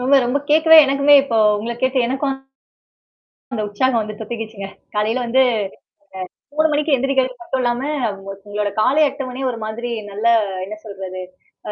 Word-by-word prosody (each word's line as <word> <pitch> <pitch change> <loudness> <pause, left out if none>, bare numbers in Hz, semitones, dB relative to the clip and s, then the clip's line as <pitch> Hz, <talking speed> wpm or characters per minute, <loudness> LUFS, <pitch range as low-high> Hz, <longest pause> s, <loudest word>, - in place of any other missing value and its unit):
ரொம்ப, 260 +3 +3
ரொம்ப 250 +4 0
கேக்கவே 320 +1 +6
எனக்குமே 280 +1 +4
இப்போ 245 -5 -2 0.2
உங்கள 230 +3 -4
கேட்டு 260 +1 +1
எனக்கும், 270 +2 -1 1.2
அந்த 220 - -2
உற்சாகம் 230 +3 +1
வந்து 215 0 -6
தொத்துக்கிடுச்சுங்க. 220 -3 -6 0.3
காலையில 225 +4 0
வந்து 260 +3 +3 1.1
அ - - -18
3 315 - +4
மணிக்கு 300 +1 0
எழுந்திரிக்கிறது 265 0 0
மட்டும் 335 -7 -3
இல்லாம, 240 +1 0 0.7
உங்களுடைய 205 0 -2
காலை 285 +7 +3
8 275 0 -6
மணியே 260 +1 -4
ஒரு 230 - -6
மாதிரி 235 +3 -5 0.2
நல்ல 210 +3 -3 0.4
என்ன 210 +3 -7
சொல்றது? 190 -3 -7 0.5
அ - - -2
250 Hz, 155 wpm, -19 LUFS, 215-270 Hz, 1.2 s, கேக்கவே